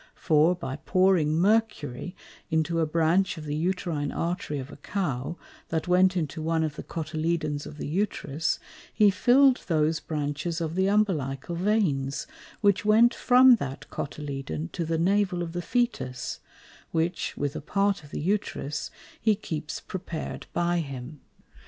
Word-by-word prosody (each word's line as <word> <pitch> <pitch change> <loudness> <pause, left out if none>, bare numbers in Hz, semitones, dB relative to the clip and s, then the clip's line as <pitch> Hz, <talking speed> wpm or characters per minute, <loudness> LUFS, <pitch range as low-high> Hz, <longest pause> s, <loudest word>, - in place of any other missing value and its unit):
For 160 +1 +3
by 145 -6 -5
pouring 170 -1 +3
Mercury 180 - +1 0.3
into 160 0 +1
a 160 - +2
Branch 165 +4 +2
of 155 - -7
the 145 - -3
Uterine 165 -3 -1
Arterie 165 -4 -2
of 135 +2 -7
a - - -11
Cow, 150 -3 -3 0.3
that 160 +1 -1
went 185 +1 +4
into 160 -1 -2
one 160 0 +1
of 155 -2 -2
the - - -6
Cotyledones 155 -2 -2
of 150 - -10
the - - -5
Uterus, 155 -3 -1 0.3
he 210 -2 +5
fill'd 255 +5 +5
those 160 -1 +2
Branches 155 +2 -3
of 165 -1 -2
the 190 +2 +2
Umbilical 170 -8 0
Veins, 170 -8 0 0.4
which 200 -3 +3
went 225 +3 +5
from 255 -1 +6
that 135 -8 -6
Cotyledon 135 - -4
to 170 - -3
the 165 +1 0
Navel 185 0 +2
of 165 -1 -6
the 175 - -2
Fœtus; 170 - -1 0.5
which, 165 +1 -1
with 145 -1 -2
a - - -4
part 200 +3 0
of 145 - -13
the - - -4
Uterus, 160 -5 -2 0.3
he 220 -2 +4
keeps 155 -6 -5
prepared 175 -3 -6
by 175 0 +1
him. 135 -1 -6
165 Hz, 150 wpm, -27 LUFS, 150-190 Hz, 0.5 s, from